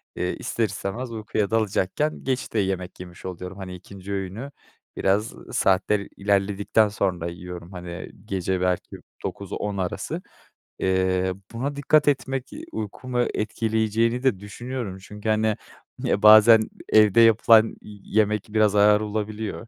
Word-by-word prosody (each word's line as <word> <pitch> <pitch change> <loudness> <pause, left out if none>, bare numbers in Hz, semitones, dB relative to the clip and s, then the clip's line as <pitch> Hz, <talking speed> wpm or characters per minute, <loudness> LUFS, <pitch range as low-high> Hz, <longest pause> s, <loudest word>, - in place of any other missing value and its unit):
eee, 90 0 -2
ister 115 - -1
istemez 105 +5 -4
uykuya 105 -2 -2
dalacakken 110 +6 0
geç 130 -1 -2
de 110 - +1
yemek 95 -2 -2
yemiş 90 -1 -11
oluyorum. 90 +1 -6
Hani, 95 -2 -7
2'nci 95 +2 -9
öğünü, 100 +8 -4 0.5
biraz 100 +3 +1 0.2
saatler 100 +2 +2
ilerledikten 100 +2 +2
sonra 90 -4 -1
yiyorum. 90 +1 -8
Hani, 90 -1 -7
gece 95 -2 -1
belki 90 -1 -1 0.3
9-10 100 +1 -4
arası. 90 -2 -3 0.6
Eee, 95 0 +1 0.2
buna 135 +5 -3
dikkat 145 +1 +3
etmek, 135 -2 0
eee, - - -8
uykumu 120 +4 -3
etkileyeceğini 110 +2 0
de 125 -8 +2
düşünüyorum. 105 0 -6
Çünkü, 105 +3 -7
hani, 110 0 +2 0.4
ya 100 - 0
bazen 110 +1 +9 0.3
evde 110 +1 +6
yapılan 115 0 +6
yemek 105 0 -1
biraz 105 -1 +3
ağır 105 +1 +5
olabiliyor 110 +1 -4
105 Hz, 130 wpm, -24 LUFS, 95-110 Hz, 0.6 s, bazen